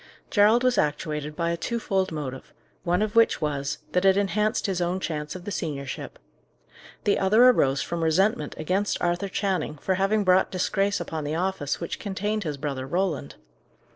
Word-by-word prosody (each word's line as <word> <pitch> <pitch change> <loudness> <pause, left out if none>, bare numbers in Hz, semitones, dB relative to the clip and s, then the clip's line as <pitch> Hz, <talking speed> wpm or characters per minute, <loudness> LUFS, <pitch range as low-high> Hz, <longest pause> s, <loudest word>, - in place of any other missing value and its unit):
Gerald 215 +4 +5
was 255 -1 +3
actuated 150 0 -2
by 170 +1 0
a 170 - -2
twofold 195 -3 -1
motive, 135 -4 -6 0.3
one 180 +3 +1
of 215 +1 -3
which 230 0 +4
was, 145 -2 -2
that 180 - +1
it 195 0 +5
enhanced 210 +2 +1
his 190 -3 -1
own 175 +2 0
chance 150 -3 -4
of 185 -1 -9
the 205 - -4
seniorship. 140 -7 -5 0.9
The 205 - +2
other 215 +6 +5
arose 135 - +2
from 170 -1 -3
resentment 190 +9 +1
against 185 +6 -1
Arthur 175 +3 -1
Channing, 190 -6 -1
for 190 - -1
having 195 +3 +1
brought 185 0 +4
disgrace 195 +2 0
upon 160 -1 -4
the 150 +2 -2
office 180 -5 -1
which 170 - -5
contained 205 +1 -2
his 150 -3 -3
brother 135 -2 -4
Roland. 175 -2 -2
185 Hz, 170 wpm, -25 LUFS, 155-200 Hz, 0.9 s, Gerald